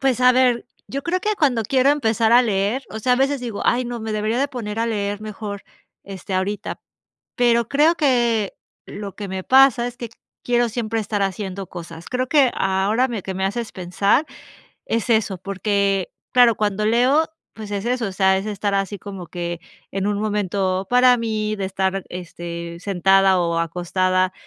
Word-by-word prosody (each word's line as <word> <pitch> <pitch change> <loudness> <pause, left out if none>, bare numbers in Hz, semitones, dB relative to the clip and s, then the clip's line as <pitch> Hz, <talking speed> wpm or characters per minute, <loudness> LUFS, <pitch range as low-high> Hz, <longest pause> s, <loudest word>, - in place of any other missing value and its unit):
Pues, 260 -2 +1
a 250 0 +7
ver, 250 -2 +2 0.2
yo 275 +1 -4
creo 360 +2 -1
que 425 - -1
cuando 255 -8 +2
quiero 265 +5 +3
empezar 230 -5 +2
a 245 +1 +7
leer 210 +4 0
o 220 - -5
sea, 250 +3 +1
a - - +4
veces 275 0 +1
digo: 230 -4 -5
"Ay, 245 +1 +2
no, 240 -1 -5
me 220 0 -4
debería 215 +3 -1
de 280 +1 +1
poner 225 -4 -5
a 230 - +1
leer 205 -2 -2
mejor, 210 -1 -6 0.4
este, 195 0 -6
ahorita", 195 +2 -2 0.6
pero 235 -2 +3
creo 305 +4 +3
que 240 - +1 0.3
lo 200 -2 -8
que 205 -2 -6
me 190 0 -5
pasa 260 -2 +5
es 245 0 -6
que 235 -3 -6 0.3
quiero 240 -1 +2
siempre 225 0 -2
estar 205 -1 -2
haciendo 195 -1 -3
cosas. 170 -1 -9
Creo 255 0 -1
que 275 -4 +4
ahora 195 +6 +1
me 225 -5 -3
que 190 - -5
me 190 +1 -3
haces 230 +3 -3
pensar 195 - +1 0.6
es 230 +1 -1
eso, 215 -4 +2
porque, 195 0 0 0.2
claro, 245 -2 +6
cuando 210 0 0
leo, 255 +8 +4 0.3
pues 215 -2 -9
es 200 +1 -3
eso, 245 -2 0
o - - -7
sea, 190 0 +3
es 195 - -5
estar 205 -1 -2
así 195 0 -1
como 195 -2 -8
que 175 -1 -4 0.3
en 195 0 -1
un 205 -1 0
momento 195 -3 -1
para 250 0 +6
mí 215 -2 -2
de 195 - -3
estar, 190 0 -1
este, 170 -1 -7
sentada 195 0 +3
o 170 -1 0
acostada 185 +2 0
210 Hz, 185 wpm, -21 LUFS, 190-240 Hz, 0.6 s, a